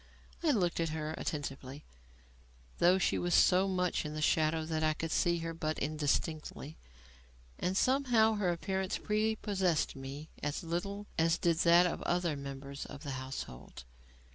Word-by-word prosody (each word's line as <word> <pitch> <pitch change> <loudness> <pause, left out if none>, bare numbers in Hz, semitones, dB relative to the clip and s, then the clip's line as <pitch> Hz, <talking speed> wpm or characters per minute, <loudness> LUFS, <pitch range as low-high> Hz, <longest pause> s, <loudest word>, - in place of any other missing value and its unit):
I 335 - +1
looked 180 - +1
at 165 -1 0
her 155 0 -3
attentively 140 -1 -5 0.9
(though 180 +2 +5
she 190 - +1
was 175 0 +1
so 185 +1 +5
much 180 -2 0
in 150 0 -5
the - - -3
shadow 155 +1 +2
that 160 -1 -2
I 155 0 +2
could 165 +1 -4
see 170 0 +2
her 165 - -3
but 155 -1 -2
indistinctly) 155 0 -2 0.8
and 185 +1 0
somehow 245 -4 +3
her 205 -4 0
appearance 190 +2 -2
prepossessed 210 -7 0
me 135 +3 -8
as 145 +3 -2
little 200 +5 -3
as 165 +1 +3
did 170 -3 +2
that 170 +1 +6
of 175 - -1
the - - -6
other 175 -3 +1
members 140 0 -7
of 145 +1 -10
the 140 - -4
household. 130 - -7
165 Hz, 160 wpm, -32 LUFS, 150-185 Hz, 0.9 s, that